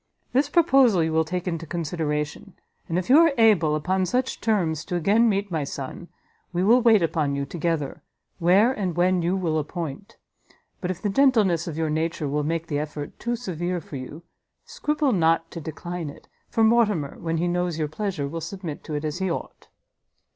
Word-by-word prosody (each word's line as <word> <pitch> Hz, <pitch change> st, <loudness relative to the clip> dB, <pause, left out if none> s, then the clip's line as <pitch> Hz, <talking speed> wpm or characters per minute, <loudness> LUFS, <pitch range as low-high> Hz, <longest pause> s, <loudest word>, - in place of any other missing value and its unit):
This 270 Hz, +4 st, +2 dB
proposal 270 Hz, -, +4 dB
you 160 Hz, 0 st, -1 dB
will 160 Hz, 0 st, +3 dB
take 180 Hz, +3 st, -4 dB
into 165 Hz, -2 st, -3 dB
consideration, 155 Hz, +1 st, -3 dB, 0.3 s
and 165 Hz, -, 0 dB
if 180 Hz, -, -2 dB
you 275 Hz, +5 st, +7 dB
are 330 Hz, -3 st, +5 dB
able, 200 Hz, -10 st, +4 dB
upon 185 Hz, +4 st, 0 dB
such 255 Hz, +4 st, -1 dB
terms, 170 Hz, -9 st, 0 dB
to 180 Hz, -, -3 dB
again 210 Hz, +7 st, +3 dB
meet 200 Hz, -1 st, -1 dB
my 160 Hz, -3 st, -1 dB
son, 140 Hz, +4 st, -6 dB, 0.4 s
we 180 Hz, 0 st, 0 dB
will 235 Hz, +6 st, +5 dB
wait 225 Hz, -5 st, +5 dB
upon 155 Hz, -4 st, 0 dB
you 140 Hz, 0 st, -2 dB
together, 160 Hz, -2 st, -2 dB, 0.4 s
where 190 Hz, +8 st, +5 dB
and 190 Hz, -8 st, -3 dB
when 180 Hz, +1 st, +2 dB
you 175 Hz, +3 st, +1 dB
will 165 Hz, -5 st, 0 dB
appoint; 165 Hz, +6 st, -6 dB, 0.6 s
but 180 Hz, -, -3 dB
if 185 Hz, 0 st, -4 dB
the 205 Hz, -, +1 dB
gentleness 205 Hz, -, +3 dB
of 160 Hz, -2 st, -5 dB
your 160 Hz, -1 st, 0 dB
nature 160 Hz, 0 st, -1 dB
will 145 Hz, +2 st, 0 dB
make 165 Hz, +2 st, -2 dB
the 145 Hz, -3 st, -2 dB
effort 150 Hz, -1 st, -6 dB
too 240 Hz, 0 st, -1 dB
severe 180 Hz, -6 st, -3 dB
for 145 Hz, -3 st, -8 dB
you, 145 Hz, +6 st, -8 dB, 0.4 s
scruple 300 Hz, -, 0 dB
not 165 Hz, -4 st, +2 dB
to 170 Hz, -, -7 dB
decline 165 Hz, +1 st, -5 dB
it, -, -, -13 dB, 0.2 s
for 225 Hz, -, +1 dB
Mortimer, 215 Hz, -10 st, +2 dB
when 165 Hz, 0 st, -2 dB
he 175 Hz, +2 st, 0 dB
knows 175 Hz, -1 st, -1 dB
your 155 Hz, -2 st, -1 dB
pleasure, 160 Hz, -2 st, -3 dB
will 165 Hz, +3 st, -5 dB
submit 170 Hz, -1 st, -6 dB
to 155 Hz, -, -5 dB
it 150 Hz, +1 st, -3 dB
as 155 Hz, +3 st, -3 dB
he 190 Hz, 0 st, 0 dB
ought. 170 Hz, -, -6 dB
175 Hz, 195 wpm, -24 LUFS, 155-200 Hz, 0.6 s, you